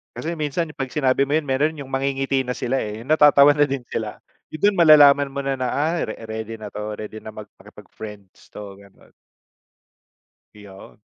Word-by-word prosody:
Kasi 170 +2 -4
minsan 155 +2 -2
'pag 130 -2 -5
sinabi 135 -2 +1
mo 140 - -4
yun, 145 - -10
meron 145 +3 0
yung 135 - -8
mangingiti 135 0 -1
na 125 - -4
sila, 125 +1 -2
eh. 105 +1 -6
Yung 125 - -13
natatawa 145 -2 +6
na 145 - +4
din 140 -1 -1
sila. 110 -2 -5 0.3
Yun, 155 - -7
dun 205 0 +3
malalaman 145 -4 +6
mo 140 - -5
na 135 0 -2
na, 130 -1 -3
ay 160 +4 -1
re - - -5
ready 110 0 -6
na 105 - -7
'to, 105 +1 -6
ready 110 0 -8
na 110 - -8
mag 105 -1 -10
makipag-friends 105 -3 -13
'to, 100 -2 -10
ganon. 100 0 -20 1.4
Yun. 100 0 -15
135 Hz, 190 wpm, -21 LUFS, 110-145 Hz, 1.4 s, natatawa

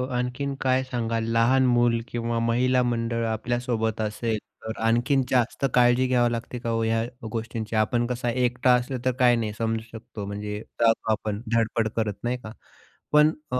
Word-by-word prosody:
आणखीन 125 +3 -2
काय 130 0 +2
सांगाल, 115 -3 -2
लहान 125 +3 +4
मूल 120 -1 +3
किंवा 115 0 -2
महिला 125 +2 +2
मंडळ 115 -1 -1
आपल्यासोबत 115 0 -1
असेल, 110 +1 -1 0.3
तर 110 0 -5
आणखीन 120 +4 +2
जास्त 125 +2 +1
काळजी 125 +1 +4
घ्यावी 120 -2 +2
लागते 120 +1 -4
का 115 - -4
हो 115 0 0
ह्या 115 0 +1 0.3
गोष्टींची? 115 -1 -4
आपण 115 +2 +2
कसा 120 0 -2
एकटा 125 0 +2
असलं 125 +1 0
तर 130 - +3
काय 125 -1 +5
नाही 110 -3 -2
समजू 115 0 -1
शकतो, 115 -2 -8
म्हणजे 105 +1 -5 0.2
जातो 115 -1 +3
आपण 105 -1 -2
धडपड 115 0 +1
करत, 110 -2 0
नाही 120 +1 -1
का. 110 - -7 0.6
पण 150 +1 +6 0.2
अ, 125 - +1
120 Hz, 170 wpm, -25 LUFS, 115-125 Hz, 0.6 s, पण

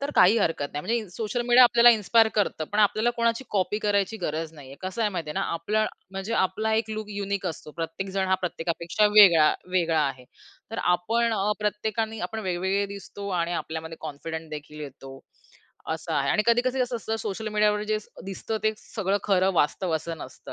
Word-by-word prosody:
तर 280 +1 -2
काही 190 +5 +6
हरकत 165 -7 0
नाही. 145 - -3
म्हणजे 230 - 0
इन 215 - -7
सोशल 230 +2 -2
मीडिया 245 +1 +8
आपल्याला 240 0 +7
इन्स्पायर 220 +2 +4
करतं. 200 -6 0
पण 210 - -1
आपल्याला 215 +3 +3
कोणाची 235 +2 +1
कॉपी 205 +1 0
करायची 205 0 0
गरज 160 +1 -3
नाही 140 -3 -12
आहे. 140 - -11
कसं 190 +5 -6
आहे 210 - +2
माहिती 170 -5 -4
आहे - - -6
ना, - - 0
आपलं 215 +6 0 0.2
म्हणजे 195 +4 -4
आपला 215 +4 -2
एक 220 0 0
लूक 215 -1 -4
युनिक 200 -1 -3
असतो. 160 -3 -6
प्रत्येकजण 190 +4 -3
हा 190 - +4
प्रत्येकापेक्षा 170 +5 0
वेगळा, 170 -7 +8 0.2
वेगळा 170 -3 +2
आहे. 130 -2 -6 0.5
तर 225 - -4
आपण 225 +7 +1
अ, 210 -1 +1
प्रत्येकाने 220 +1 -2
आपण 220 0 -4
वेगवेगळे 190 +1 0
दिसतो 200 +1 -8
आणि 170 +1 -1
आपल्यामध्ये 160 0 -6
कॉन्फिडन्स 160 +1 -6
देखील 150 0 -8
येतो. 135 -2 -9 0.7
असं 160 +1 -4
आहे. 140 -2 +1
आणि 210 - +3
कधी-कधी 250 +2 +2
असं 250 -1 0
असतं 225 -1 -3
सोशल 215 +1 -4
मीडियावर 210 0 +2
जे 215 0 +1
स - - -19 0.2
दिसतं 195 +3 -4
ते 215 - +2
सगळं 200 -2 -2
खरं 190 -2 +3
वास्तव 170 +3 +1
असं 165 +1 -6
नसतं. - - -10
200 Hz, 195 wpm, -26 LUFS, 165-220 Hz, 0.7 s, मीडिया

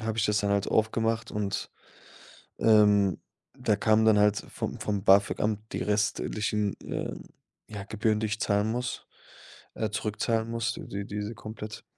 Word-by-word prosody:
habe 110 0 -3
ich 105 - +2
das 105 -1 +2
dann 100 - 0
halt 100 0 +1
aufgemacht 110 +1 +1
und, 100 -2 -3 0.9
ähm, 105 -4 +5 0.4
da 120 -5 +1
kamen 110 +1 +3
dann 110 -2 +5
halt 105 0 +4
vom - - -4
vom 100 -2 -2
BAföG-Amt 100 +1 +3
die - - -2
restlichen, 105 0 0
äh, - - -4 0.5
ja 105 -2 -7
Gebühren, 110 +1 0
die 110 - 0
ich 110 +1 -3
zahlen 105 +1 +1
muss, 125 +2 -4 0.7
äh, 110 -2 -2
zurückzahlen 110 +1 -1
muss, 115 -1 -1
d - - -8
d 100 +1 -4
diese 105 +2 -4
komplett. 110 0 -8
105 Hz, 155 wpm, -28 LUFS, 105-110 Hz, 0.9 s, ähm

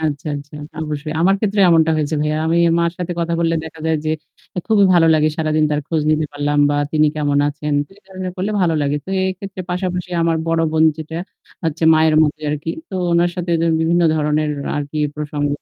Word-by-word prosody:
আচ্ছা, 150 -2 -2
আচ্ছা। 145 +1 -10 0.3
অবশ্যই। 150 0 -4
আমার 190 +3 +4
ক্ষেত্রে 205 -1 0
এমনটা 160 -1 +4
হয়েছে 155 0 -1
ভাইয়া। 150 0 0
আমি 165 +1 +2 0.2
মার 170 0 +2
সাথে 180 0 -3
কথা 170 0 -1
বললে 165 0 +1
দেখা 160 0 -10
যায় 160 -1 +2
যে 155 - 0 0.6
খুবই 215 -3 +4
ভালো 165 -1 +5
লাগে 155 0 +3
সারাদিন 155 -1 +1
তার 150 0 0
খোঁজ 160 -2 0
নিতে 155 0 +1
পারলাম 145 0 -1
বা 145 - +1 0.2
তিনি 155 -1 +4
কেমন 145 -1 +1
আছেন? 150 0 -3 0.2
এ - - -17
কাজ 190 -1 -15
গুলো 185 -1 -3
করলে 195 +4 -2
ভালো 170 -3 +2
লাগে। 145 +1 0
তো - - -15 0.2
এক্ষেত্রে 190 0 -7
পাশাপাশি 180 0 -3
আমার 165 -1 +2
বড় 165 0 +1
বোন 160 0 +4
যেটা, 160 +1 -7 0.5
হচ্ছে 160 0 -1
মায়ের 155 0 +3
মতো 150 0 0
আরকি। 150 +2 -3 0.2
তো - - -6 0.2
উনার 170 +1 +3
সাথে 175 -1 -3 0.3
বিভিন্ন 170 +2 +2
ধরনের 150 0 0 0.3
আর 145 - -1
কি 155 - -4 0.2
প্রসঙ্গ 145 -1 -2
160 Hz, 205 wpm, -19 LUFS, 150-170 Hz, 0.6 s, ভালো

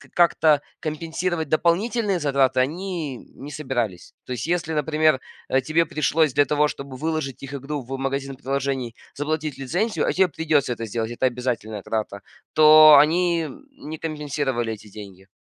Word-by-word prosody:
как-то 160 -4 +4 0.2
компенсировать 165 +1 -3
дополнительные 195 +5 +1
затраты 135 -3 +2
они 160 -1 -2 0.2
не 145 +2 -9
собирались. 120 - -3
То 125 - -5
есть 125 +5 -4
если, 170 -2 -1
например, 155 -1 +2 0.3
э, 130 - +2
тебе 160 +5 +1
пришлось 155 -1 +1
для 145 +2 +4
того, 150 +2 +2
чтобы 140 -2 -7
выложить 155 -4 -3
их 135 - -7
игру 140 +1 -4
в 135 +2 -6
магазин 135 0 -3
приложений, 135 -3 -3 0.2
заплатить 155 0 -3
лицензию 180 - -1
(а - - +2
тебе 190 0 +4
придется 150 -5 0
это 115 -1 -6
сделать- 115 +1 -3
это 130 +2 +1
обязательная 120 -4 -3
трата), 105 -3 -3 0.3
то 155 -1 +9
они 170 +1 +2 0.3
не 155 - -7
компенсировали 145 -7 -2
эти 105 0 -12
деньги. 95 -2 -11
145 Hz, 150 wpm, -23 LUFS, 130-160 Hz, 0.3 s, то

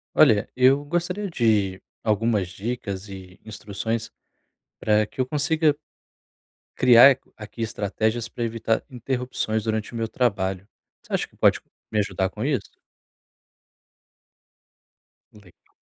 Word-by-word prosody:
Olha, 105 -1 +5
eu 130 +3 +4
gostaria 180 +6 -2
de 105 - +1 0.2
algumas 110 -2 +1
dicas 100 0 -5
e 95 -1 -11
instruções 110 +2 -4 0.7
pra 105 0 +2
que 130 - -8
eu 130 - +2
consiga 150 +1 +1 1.0
criar 125 +2 +8 0.2
aqui 110 +2 -7
estratégias 110 +2 -2
pra 120 - -5
evitar 115 -1 -1
interrupções 125 -4 -3
durante 110 +1 -2
o - - -7
meu 115 -1 -1
trabalho. 100 -6 -1 0.3
Você - - -20
acha - - 0
que - - -27
pode - - +3 0.3
me 110 - -1
ajudar 95 -2 0
com 105 +5 -5
isso? 140 -2 -1 2.6
Legal. 100 -5 -20
110 Hz, 120 wpm, -24 LUFS, 105-125 Hz, 2.6 s, criar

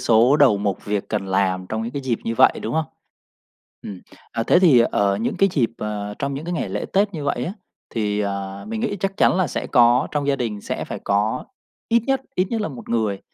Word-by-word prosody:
số 120 +5 +4
đầu 135 -9 +5
mục 100 -2 -2
việc 105 -1 -2
cần 105 -3 -2
làm 95 -1 0
trong 110 0 -2
những 115 +2 -5
cái 140 - -4
dịp 125 -3 -1
như 115 - -1
vậy, - - +6
đúng 115 - -3
không? 160 - +1 1.0
Ừm, 95 -3 -8 0.3
à, 115 - -1
thế 175 - +4
thì 165 -9 +6
ở 100 -1 +2
những 110 +4 -2
cái 195 - +4
dịp, 125 -9 +1
ờ, 105 -1 -4
trong 140 -1 -2
những 140 +3 -5
cái 175 - -3
ngày 150 - -2
lễ 105 +2 -3
tết 200 0 +2
như 150 -3 -4
vậy 125 -3 -1
á 180 - -3 0.4
thì, 105 -2 0
à, 100 -1 -4
mình 225 -1 -3
nghĩ 215 -3 -1
chắc 195 0 -2
chắn - - +4
là 185 - +2
sẽ - - -4
có 120 -1 +4
trong 145 -1 -1
gia 140 - +2
đình 110 -5 -3
sẽ - - -4
phải - - -6
có 105 +5 0 0.4
ít 235 0 +3
nhất 270 -1 +1
ít 185 - +1
nhất 230 -2 -1
là 210 - -1
một 130 -5 -10
người 110 -4 0
120 Hz, 245 wpm, -22 LUFS, 105-150 Hz, 1.0 s, vậy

